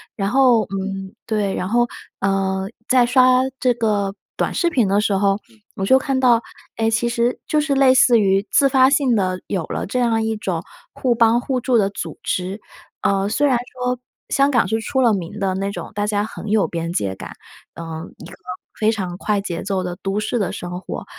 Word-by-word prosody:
然 195 -2 -1
后 250 -2 +4
嗯， 195 0 -5
对， 210 -3 -1
然 180 - -2
后， 240 +4 +3 0.4
呃， 195 0 0 0.2
在 255 -2 +4
刷 255 +1 +5 0.2
这 250 -1 +3
个 210 -4 -1 0.2
短 - - -1
视 345 - +1
频 250 - +2
的 200 +2 +2
时 215 - 0
候， 195 0 +2 0.4
我 195 -4 -2
就 260 +6 +5
看 270 0 -1
到， 245 -3 +4 0.4
哎， 225 0 +1
其 230 +1 +1
实 235 +1 0
就 305 - +2
是 295 -2 0
类 270 -1 +5
似 250 -2 +5
于 195 -1 +2
自 275 - +4
发 260 -1 +5
性 275 -3 +2
的 185 -4 0
有 190 -4 -2
了 - - -4
这 250 +6 -2
样 230 -2 +1
一 220 -1 -1
种 180 -5 -3 0.3
互 250 -2 +1
帮 230 0 +3
互 260 0 -1
助 250 0 +2
的 200 -3 +2
组 200 - -6
织。 190 +3 -3 0.4
呃， 195 0 +1
虽 250 +8 +1
然 265 -4 +3
说 250 0 -4 0.3
香 275 +1 +3
港 250 -5 +3
是 225 - -1
出 265 +4 -1
了 235 -3 +4
名 190 +1 -4
的 190 -2 0
那 195 +1 -2
种， - - -7
大 205 0 -1
家 205 -1 0
很 220 0 -8
有 210 -1 +2
边 170 0 -3
界 100 - -1
感， - - -9 0.4
呃， 170 - -7 0.3
一 - - -11
个 - - -11 0.5
非 220 +1 +3
常 185 -4 -4
快 205 +1 0
节 175 -4 -4
奏 195 -2 -2
的 180 -1 -5
都 195 +2 -1
市 225 +3 -1
的 200 - -1
生 180 0 -5
活， - - -7
215 Hz, 225 characters per minute, -20 LUFS, 195-250 Hz, 0.5 s, 刷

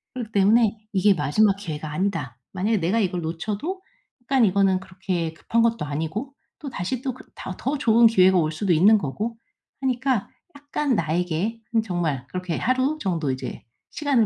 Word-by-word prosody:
그렇기 235 -4 -5
때문에 215 +2 +4 0.2
'이게 200 +1 +4
마지막 185 +7 +3
기회가 155 -6 -5
아니다.' 150 -8 -2
만약에 205 +4 +1
내가 180 +7 +1
이걸 180 -3 0
놓쳐도 205 - -3 0.4
약간 265 0 +2
이거는 195 -1 +3
그렇게 185 -3 -3
급한 230 +7 0
것도 230 -8 +1
아니고 160 - -4 0.3
또다시 255 - -4
또 265 -2 -2
그 255 - -13
다 185 - -6
더 275 +4 -1
좋은 235 -3 +5
기회가 190 -4 +5
올 155 -2 +1
수도 180 +2 0
있는 205 +7 +6
거고 215 +10 -4 0.4
하니까 260 -3 0 0.3
약간 285 -1 -1
나에게 175 +6 -1 0.3
정말 165 - -2
그렇게 180 -3 -3
하루 260 +5 +1
정도 170 -7 -1
이제 130 - -6 0.3
시간을 280 -7 +2
200 Hz, 350 characters per minute, -24 LUFS, 170-235 Hz, 0.4 s, 있는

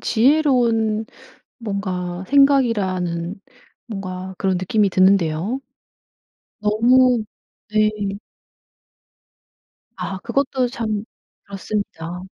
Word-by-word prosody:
지혜로운 235 -4 +2 0.6
뭔가 185 -4 -3
생각이라는 200 -11 +2 0.5
뭔가 190 -3 -6
그런 190 -2 0
느낌이 200 +3 +1
드는데요. 185 +4 +2 1.0
너무 235 +2 +4 0.5
네. 215 0 +3 2.1
아 195 - -4
그것도 255 +3 0
참 220 -4 -3 0.4
그렇습니다. 195 -4 -5
210 Hz, 170 characters per minute, -21 LUFS, 185-240 Hz, 2.1 s, 너무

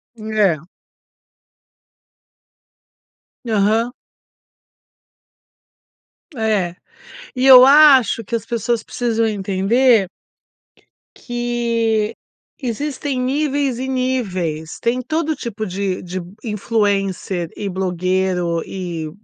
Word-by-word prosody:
É. 215 -6 +1 2.9
Aham. 220 +2 +1 2.4
É. 210 -6 0 0.6
E 255 - 0
eu 255 -1 +10
acho 270 -6 +6
que 230 +4 -3
as 225 - -4
pessoas 230 0 -1
precisam 230 -2 -1
entender 205 +2 +2 1.2
que 235 -3 -1 0.5
existem 270 +2 -3
níveis 275 -1 0
e 260 - -3
níveis. 185 -12 -2
Tem 240 +2 0
todo 315 +4 -1
tipo 220 -3 -5
de 190 -1 -3
de 180 +1 -5 0.2
influencer 200 -5 -1
e 205 - -4
blogueiro, 185 -2 -1
e 170 -4 -5
220 Hz, 80 wpm, -19 LUFS, 190-250 Hz, 2.9 s, eu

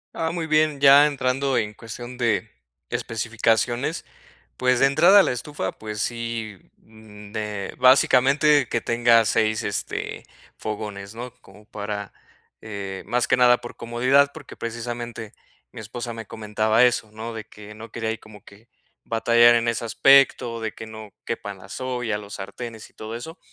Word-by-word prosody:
Ah, 160 - -1
muy 170 -1 -3
bien, 155 -2 +2
ya 140 +1 +8
entrando 135 -1 0
en 105 -1 -1
cuestión 120 +3 -9
de 115 -3 +1 0.4
especificaciones, 115 +4 -1 0.5
pues, 125 -1 +2
de - - +5
entrada 170 +9 +6
a - - +2
la - - 0
estufa, 125 -5 -4
pues 105 -1 -6
sí, 115 -4 -4 0.2
mm, 105 -2 -15
de 105 -2 -4
básicamente, 135 +2 +5
que 120 - 0
tenga 115 -1 +3
6 110 0 +1
este, - - -4 0.4
fogones 105 -1 -6
¿no?, 120 +1 -7
como 105 0 -18
para, 105 -1 -6 0.5
eh, 100 -3 -6
más 120 +3 +1
que - - +3
nada, 125 -1 +6
por 120 - -10
comodidad 130 +4 +2
porque, - - -11
precisamente, 120 -1 -6 0.4
mi - - -9
esposa 120 +3 -6
me 115 -2 -8
comentaba 110 +2 +2
eso, 115 -3 0
¿no?, 110 +2 -7
de 110 -1 -7
que 105 0 -13
no 110 +2 -11
quería 115 -1 -3
ahí 110 - -3
como 105 -2 -15
que 100 +3 -17 0.4
batallar 120 +1 +5
en 120 0 +1
ese 115 0 -1
aspecto, 125 -1 +4
de 110 -1 -3
que 110 - -9
no 110 -1 -10 0.2
quepan 100 -4 -5
las 95 +6 -9
ollas, 125 -4 -2
los 100 0 -9
sartenes 110 +3 -8
y - - -42
todo 110 +1 -7
eso, 160 +9 -8
115 Hz, 165 wpm, -23 LUFS, 110-125 Hz, 0.5 s, ya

